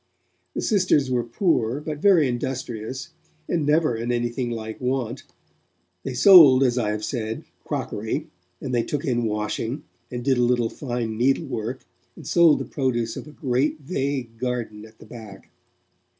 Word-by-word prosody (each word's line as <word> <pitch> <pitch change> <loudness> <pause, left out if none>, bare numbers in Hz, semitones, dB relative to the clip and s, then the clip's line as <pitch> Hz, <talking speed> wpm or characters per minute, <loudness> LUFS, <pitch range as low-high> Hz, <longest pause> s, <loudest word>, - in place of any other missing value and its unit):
The - - -2
sisters 180 - +2
were 125 -1 +1
poor, 120 - 0
but 150 0 -5
very 175 -6 +5
industrious, 125 0 -4 0.4
and 160 -4 0
never 150 -4 +3
in 115 +2 -2
anything 120 +1 -1
like 110 -1 -6
want; 125 -1 -2 0.8
they 130 +4 -5
sold, 140 -4 +8
as 125 -2 +2
I 115 -4 0
have 105 0 -2
said, 110 -3 -4 0.2
crockery, 110 +2 -3 0.3
and 130 - -5
they 120 - +3
took 145 +6 -3
in 120 -4 0
washing, 110 +5 -2 0.3
and 120 0 -6
did 130 -3 +2
a - - +4
little 120 -2 +1
fine 120 -5 -4
needlework, 130 -2 -1 0.3
and - - -12
sold 170 -3 +5
the - - -4
produce 120 -4 -1
of - - -8
a - - -11
great, 140 +2 -1
vague 135 -6 -3
garden 120 -4 -3
at 110 0 -21
the - - -14
back. 110 -4 -12
125 Hz, 160 wpm, -24 LUFS, 115-140 Hz, 0.8 s, sold